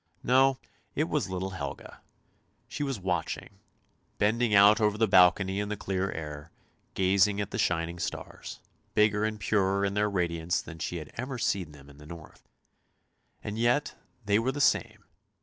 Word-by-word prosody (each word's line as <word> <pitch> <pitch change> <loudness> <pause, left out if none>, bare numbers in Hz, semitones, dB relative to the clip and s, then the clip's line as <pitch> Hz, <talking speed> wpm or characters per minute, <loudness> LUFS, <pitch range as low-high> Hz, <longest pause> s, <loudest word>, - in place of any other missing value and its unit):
No, 130 +1 +4 0.4
it 150 - +2
was 150 - -1
little 95 +1 -3
Helga. 95 - -7 0.7
She - - -6
was 135 -6 -2
watching, 90 -3 -3 0.6
bending 110 +1 +2
out 100 +2 +7
over 105 -1 +2
the 110 0 +3
balcony 95 +1 +4
in 105 0 -3
the 105 - -3
clear 95 0 -2
air, 75 -1 -7 0.5
gazing 95 +2 +3
at 100 -1 -3
the - - -4
shining 85 0 0
stars, - - -6 0.3
bigger 105 0 +3
and 110 0 -2
purer 100 -1 +1
in 100 - -1
their 105 +1 +1
radiance 85 -3 -1
than 80 -1 -9
she 90 - -3
had 75 -3 -8
ever 130 +2 -4
seen 95 -8 -1
them 70 -2 -15
in 70 0 -16
the 75 - -13
north; 85 -1 -12 0.9
and 105 +2 -5
yet 120 +5 +1 0.3
they 100 +1 +3
were 125 +3 0
the 145 - -6
same. 140 - +1
100 Hz, 165 wpm, -28 LUFS, 90-110 Hz, 0.9 s, out